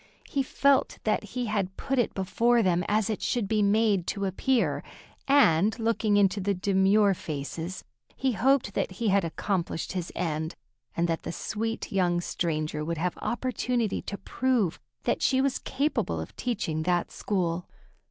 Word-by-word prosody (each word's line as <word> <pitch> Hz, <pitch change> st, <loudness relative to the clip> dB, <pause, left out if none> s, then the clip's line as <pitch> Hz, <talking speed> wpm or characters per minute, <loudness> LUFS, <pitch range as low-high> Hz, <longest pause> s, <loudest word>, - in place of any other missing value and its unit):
He 280 Hz, -, 0 dB
felt 275 Hz, +1 st, +2 dB
that 215 Hz, -, +1 dB
he 245 Hz, +4 st, -4 dB
had 200 Hz, -4 st, -2 dB
put 270 Hz, -1 st, -1 dB
it 240 Hz, -, 0 dB
before 230 Hz, +5 st, +2 dB
them 180 Hz, -2 st, +2 dB
as 210 Hz, 0 st, +2 dB
it 215 Hz, -2 st, -2 dB
should 235 Hz, -5 st, 0 dB
be 215 Hz, +1 st, +1 dB
made 205 Hz, -3 st, +3 dB
to 200 Hz, -1 st, -1 dB
appear, 235 Hz, +6 st, +1 dB, 0.5 s
and, 220 Hz, -, +4 dB
looking 225 Hz, -2 st, +1 dB
into 200 Hz, 0 st, +3 dB
the 200 Hz, +1 st, 0 dB
demure 195 Hz, +2 st, +3 dB
faces, 160 Hz, +2 st, -5 dB, 0.3 s
he 265 Hz, 0 st, +1 dB
hoped 240 Hz, 0 st, +2 dB
that 185 Hz, -, -1 dB
he 215 Hz, +3 st, -1 dB
had 200 Hz, 0 st, +3 dB
accomplished 170 Hz, 0 st, -2 dB
his 180 Hz, -3 st, -4 dB
end, 160 Hz, -2 st, -2 dB, 0.4 s
and 170 Hz, +1 st, +2 dB
that 165 Hz, -1 st, -1 dB
the -, -, -5 dB
sweet 225 Hz, +5 st, -3 dB
young 180 Hz, -3 st, +2 dB
stranger 155 Hz, -3 st, -2 dB
would 165 Hz, +1 st, -2 dB
have 175 Hz, +3 st, -1 dB
opportunity 245 Hz, -3 st, -1 dB
to 200 Hz, -, -5 dB
prove 240 Hz, -9 st, 0 dB, 0.2 s
that -, -, 0 dB
she 260 Hz, -, +3 dB
was 270 Hz, -1 st, +1 dB
capable 285 Hz, +3 st, -1 dB
of -, -, -7 dB
teaching 200 Hz, -10 st, -2 dB
that 175 Hz, +1 st, 0 dB
school. 180 Hz, -3 st, -2 dB
200 Hz, 160 wpm, -27 LUFS, 175-230 Hz, 0.5 s, and